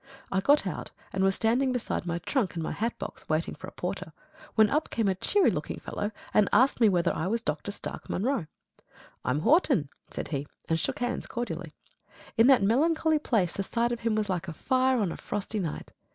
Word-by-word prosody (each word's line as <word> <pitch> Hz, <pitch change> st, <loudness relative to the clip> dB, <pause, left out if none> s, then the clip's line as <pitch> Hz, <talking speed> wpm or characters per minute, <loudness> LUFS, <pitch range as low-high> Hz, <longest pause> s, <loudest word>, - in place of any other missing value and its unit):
I 190 Hz, -, +2 dB
got 285 Hz, +9 st, +4 dB
out, -, -, -4 dB, 0.2 s
and 190 Hz, -, +1 dB
was 195 Hz, 0 st, +3 dB
standing 250 Hz, +4 st, +2 dB
beside 245 Hz, -7 st, -2 dB
my 170 Hz, 0 st, -1 dB
trunk 195 Hz, -, -1 dB
and 165 Hz, -, -2 dB
my -, -, -2 dB
hat 230 Hz, +2 st, -2 dB
box, -, -, -8 dB
waiting 155 Hz, +1 st, 0 dB
for -, -, -9 dB
a -, -, -8 dB
porter, -, -, -5 dB, 0.4 s
when 220 Hz, -1 st, +6 dB
up 300 Hz, +2 st, +1 dB
came 225 Hz, -3 st, 0 dB
a 190 Hz, -, +3 dB
cheery 390 Hz, -, +3 dB
looking -, -, -4 dB
fellow 205 Hz, -, -3 dB, 0.2 s
and 210 Hz, -, +4 dB
asked 255 Hz, 0 st, +4 dB
me 220 Hz, -, +7 dB
whether 175 Hz, -2 st, +2 dB
I 160 Hz, -, -1 dB
was 230 Hz, +3 st, 0 dB
Dr. 155 Hz, +2 st, -2 dB
Stark 200 Hz, -, -6 dB
Munro. 230 Hz, -, 0 dB, 0.8 s
"I'm 135 Hz, +4 st, 0 dB
Horton," 265 Hz, -, +3 dB, 0.2 s
said -, -, -5 dB
he; 145 Hz, -2 st, -3 dB, 0.2 s
and 165 Hz, 0 st, +1 dB
shook -, -, -1 dB
hands 245 Hz, 0 st, -2 dB
cordially. 175 Hz, -9 st, -4 dB, 0.6 s
In 225 Hz, +1 st, +6 dB
that 265 Hz, -6 st, +6 dB
melancholy 310 Hz, +8 st, +3 dB
place 210 Hz, -, +1 dB
the -, -, -2 dB
sight 235 Hz, +4 st, 0 dB
of 240 Hz, -, -2 dB
him 230 Hz, -2 st, 0 dB
was 215 Hz, -1 st, 0 dB
like 185 Hz, -1 st, -2 dB
a 165 Hz, -, -4 dB
fire 260 Hz, +8 st, +2 dB
on 200 Hz, -7 st, +1 dB
a -, -, -6 dB
frosty 210 Hz, +1 st, -3 dB
night. 170 Hz, -6 st, -4 dB
215 Hz, 210 wpm, -28 LUFS, 180-250 Hz, 0.8 s, me